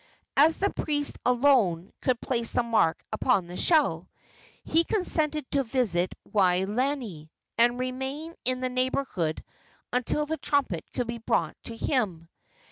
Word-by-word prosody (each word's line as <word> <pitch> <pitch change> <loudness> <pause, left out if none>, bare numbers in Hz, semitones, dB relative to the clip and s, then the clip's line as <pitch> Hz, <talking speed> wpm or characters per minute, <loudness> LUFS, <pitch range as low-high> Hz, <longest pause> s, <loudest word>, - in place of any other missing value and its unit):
As 310 +3 +5
the 400 +1 +1
priest 290 -1 -1
alone 240 -9 +3
could 250 -2 +1
place 235 -3 -1
the 245 - +2
mark 225 -8 +1
upon 215 -3 +1
the 175 +1 -9
shell, 315 - +2 0.5
he 330 +1 +2
consented 310 -7 0
to 280 -1 +2
visit 215 -8 0
Waolani, 200 - 0 0.3
and 240 +1 +4
remain 265 +5 -4
in 255 +1 0
the 255 - -1
neighborhood 255 - -1 0.5
until 255 +4 +1
the 320 +2 -3
trumpet 270 - 0
could 245 - -2
be 235 0 -5
brought 225 - 0
to 230 - -5
him. 190 - -1
250 Hz, 135 wpm, -27 LUFS, 200-285 Hz, 0.5 s, As